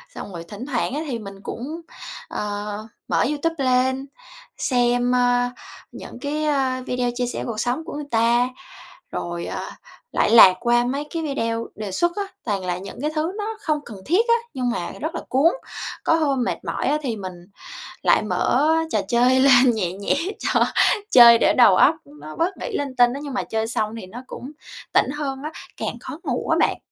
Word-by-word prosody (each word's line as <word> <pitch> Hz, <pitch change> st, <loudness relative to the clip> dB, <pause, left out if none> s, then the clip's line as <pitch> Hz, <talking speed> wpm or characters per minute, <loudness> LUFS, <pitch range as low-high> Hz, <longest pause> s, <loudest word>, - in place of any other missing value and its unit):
Xong 200 Hz, -, -7 dB
rồi 170 Hz, -1 st, -6 dB
thỉnh 205 Hz, +8 st, -8 dB
thoảng 255 Hz, -2 st, -1 dB
á, 300 Hz, -, -2 dB
thì 235 Hz, -, -3 dB
mình 195 Hz, -2 st, -9 dB
cũng, 305 Hz, +8 st, -6 dB, 0.5 s
ờ, 210 Hz, +1 st, -4 dB, 0.2 s
mở -, -, +2 dB
YouTube 300 Hz, +3 st, -1 dB
lên, 260 Hz, +1 st, +2 dB, 0.5 s
xem, 245 Hz, -1 st, +1 dB
ơ, 245 Hz, 0 st, +2 dB, 0.4 s
những -, -, -10 dB
cái, 300 Hz, +1 st, -2 dB
ơ, 265 Hz, -3 st, 0 dB
video 250 Hz, -1 st, -1 dB
chia 250 Hz, -, 0 dB
sẻ -, -, -4 dB
cuộc 225 Hz, -2 st, -4 dB
sống 250 Hz, +8 st, -1 dB
của -, -, -7 dB
người 295 Hz, 0 st, -5 dB
ta, 235 Hz, +2 st, +3 dB, 0.6 s
rồi, 170 Hz, 0 st, -4 dB
ờ, -, -, -5 dB, 0.4 s
lại -, -, +2 dB
lạc 205 Hz, -5 st, +9 dB
qua 240 Hz, 0 st, +3 dB
mấy 275 Hz, +4 st, -2 dB
cái 330 Hz, -1 st, -3 dB
video 230 Hz, -6 st, -2 dB
đề 210 Hz, -2 st, -5 dB
xuất 345 Hz, -, +1 dB
á, 405 Hz, -, 0 dB, 0.2 s
toàn 200 Hz, -5 st, -2 dB
là 180 Hz, 0 st, -2 dB
những 195 Hz, +5 st, -9 dB
cái 300 Hz, +1 st, -1 dB
thứ 320 Hz, +3 st, -1 dB
nó 435 Hz, +1 st, -3 dB
không 305 Hz, -5 st, 0 dB
cần 210 Hz, -4 st, -9 dB
thiết 415 Hz, -, +2 dB
á, 465 Hz, -, +6 dB, 0.2 s
nhưng 250 Hz, -2 st, -1 dB
mà 175 Hz, -7 st, -3 dB
rất 315 Hz, +3 st, -3 dB
là 335 Hz, -, -3 dB
cuốn, 280 Hz, +6 st, +4 dB, 0.5 s
có -, -, +3 dB
hôm 280 Hz, -6 st, +1 dB
mệt -, -, -2 dB
mỏi -, -, -2 dB
á 300 Hz, -, +2 dB
thì 240 Hz, -6 st, -2 dB
mình 185 Hz, -2 st, -6 dB, 0.7 s
lại -, -, +4 dB
mở 300 Hz, -, +1 dB, 0.2 s
trò 215 Hz, -, +2 dB
chơi 250 Hz, +3 st, +4 dB
lên 260 Hz, -2 st, +6 dB
nhẹ 180 Hz, -5 st, -1 dB
nhẹ 200 Hz, +1 st, -1 dB, 0.2 s
cho -, -, +2 dB, 0.5 s
chơi 235 Hz, -2 st, +9 dB
để -, -, +3 dB
đầu 220 Hz, -7 st, +7 dB
óc -, -, +5 dB
nó 150 Hz, +2 st, -11 dB
bớt 355 Hz, +4 st, -1 dB
nghĩ 465 Hz, -5 st, -4 dB
linh 275 Hz, -3 st, -4 dB
tinh 245 Hz, 0 st, +4 dB
á, 280 Hz, -, -5 dB
nhưng 280 Hz, -, -6 dB
mà 250 Hz, -, -1 dB
chơi 220 Hz, 0 st, -2 dB
xong 220 Hz, -1 st, -1 dB
thì 195 Hz, -, -8 dB
nó 235 Hz, +7 st, -10 dB
cũng 265 Hz, +4 st, -8 dB, 0.4 s
tỉnh -, -, +4 dB
hơn 280 Hz, -2 st, -4 dB
á, 305 Hz, -, -4 dB, 0.3 s
càng -, -, -4 dB
khó -, -, -8 dB
ngủ -, -, -2 dB
á -, -, +3 dB
bạn. -, -, +2 dB
245 Hz, 205 wpm, -22 LUFS, 225-290 Hz, 0.7 s, lạc